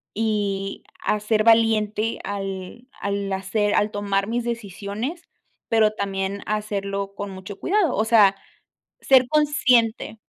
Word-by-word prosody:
y 205 -3 -2 0.2
a 210 - +1
ser 215 +1 +1
valiente 225 -1 +3
al 195 +3 -6
al 200 -1 -2
hacer 205 +2 0
al 210 +1 +2
tomar 200 -1 -1
mis 235 +2 -1
decisiones, 230 - -5 0.4
pero 220 -2 +4
también 195 -1 -3
hacerlo 200 -2 -3
con 205 0 -5
mucho 195 +1 -9
cuidado, 395 -3 +1
o 215 - +2
sea, 210 -4 +5 0.7
ser 255 -2 +5
consciente. 255 -8 +2
210 Hz, 120 wpm, -23 LUFS, 200-230 Hz, 0.7 s, sea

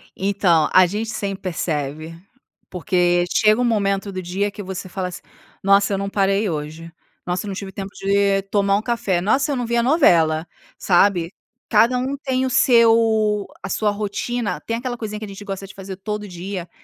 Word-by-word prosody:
Então, 185 -5 +2
a 185 - +7
gente 210 +5 -3
sempre 200 -3 -4
percebe. 155 -3 -3 0.5
Porque 175 -1 +1
chega 215 +2 +4
um - - +2
momento 200 -4 0
do 185 -1 -5
dia 190 +3 -2
que 205 - -8
você 190 0 -6
fala 185 0 -3
assim: 180 - -8 0.4
"Nossa, 200 +1 +4
eu - - 0
não 200 0 -3
parei 195 +1 +1
hoje. 160 +1 -6 0.3
Nossa, 180 +3 -2
eu - - -5
não 195 - -4
tive 195 0 -6
tempo 195 0 -6
de 195 0 +1
tomar 200 0 +1
um - - -2
café. 220 -6 -1
Nossa, 265 - +1
eu - - 0
não 245 -2 -2
vi 235 +1 -1
a 235 - +2
novela." 170 - +3 0.3
Sabe. 175 -2 +2 0.4
Cada 230 +4 +4
um 260 +3 -2
tem 260 -2 -1
o - - -1
seu 225 -4 +4 0.2
a - - -5
sua 210 +1 +1
rotina 210 +3 -3
tem 230 - -3
aquela 245 0 -4
coisinha 215 -2 -5
que 215 - -6
a - - -9
gente 200 0 -9
gosta 195 -1 -6
de 190 - -13
fazer 195 -1 -8
todo 210 +2 -5
dia, 180 0 -6
200 Hz, 195 wpm, -21 LUFS, 185-220 Hz, 0.5 s, a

